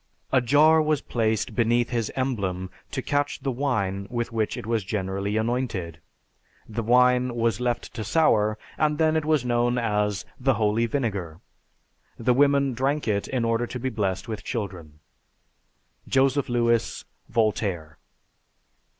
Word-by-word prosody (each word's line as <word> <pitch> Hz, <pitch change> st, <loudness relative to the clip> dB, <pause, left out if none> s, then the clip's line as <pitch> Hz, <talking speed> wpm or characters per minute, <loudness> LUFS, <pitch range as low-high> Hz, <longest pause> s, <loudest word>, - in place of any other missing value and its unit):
A 130 Hz, -, +4 dB
jar 150 Hz, +6 st, +5 dB
was 155 Hz, -1 st, +1 dB
placed 110 Hz, -5 st, -1 dB
beneath 120 Hz, 0 st, +2 dB
his 115 Hz, -3 st, -1 dB
emblem 100 Hz, -9 st, -2 dB, 0.2 s
to -, -, -4 dB
catch 145 Hz, 0 st, -1 dB
the 135 Hz, -, -1 dB
wine 100 Hz, -8 st, -1 dB
with 120 Hz, -1 st, -3 dB
which 110 Hz, -2 st, -1 dB
it -, -, -6 dB
was 115 Hz, -2 st, 0 dB
generally 100 Hz, +1 st, -2 dB
anointed; 110 Hz, -8 st, -2 dB, 0.7 s
the 110 Hz, +1 st, -3 dB
wine 125 Hz, +1 st, +3 dB
was 115 Hz, -1 st, 0 dB
left 120 Hz, -1 st, -2 dB
to 115 Hz, -, -4 dB
sour, 110 Hz, -6 st, +2 dB, 0.2 s
and 150 Hz, -1 st, +2 dB
then 160 Hz, 0 st, +2 dB
it 160 Hz, -1 st, 0 dB
was 155 Hz, -5 st, +2 dB
known 120 Hz, 0 st, +1 dB
as 105 Hz, -4 st, 0 dB
the 135 Hz, -1 st, +2 dB
'Holy 110 Hz, +2 st, +1 dB
Vinegar.' 100 Hz, -, -3 dB, 0.8 s
The 125 Hz, +2 st, +2 dB
women 140 Hz, 0 st, +3 dB
drank 135 Hz, +4 st, -1 dB
it 100 Hz, -2 st, 0 dB
in 125 Hz, -3 st, -1 dB
order 115 Hz, +1 st, 0 dB
to 125 Hz, -, -6 dB
be 130 Hz, +2 st, -1 dB
blessed 95 Hz, -5 st, -2 dB
with 110 Hz, -2 st, -5 dB
children." 90 Hz, -, -5 dB, 1.1 s
(_Joseph 135 Hz, 0 st, +2 dB
Lewis, 120 Hz, -1 st, +1 dB, 0.2 s
"Voltaire." 100 Hz, -8 st, -1 dB
115 Hz, 145 wpm, -25 LUFS, 105-130 Hz, 1.1 s, jar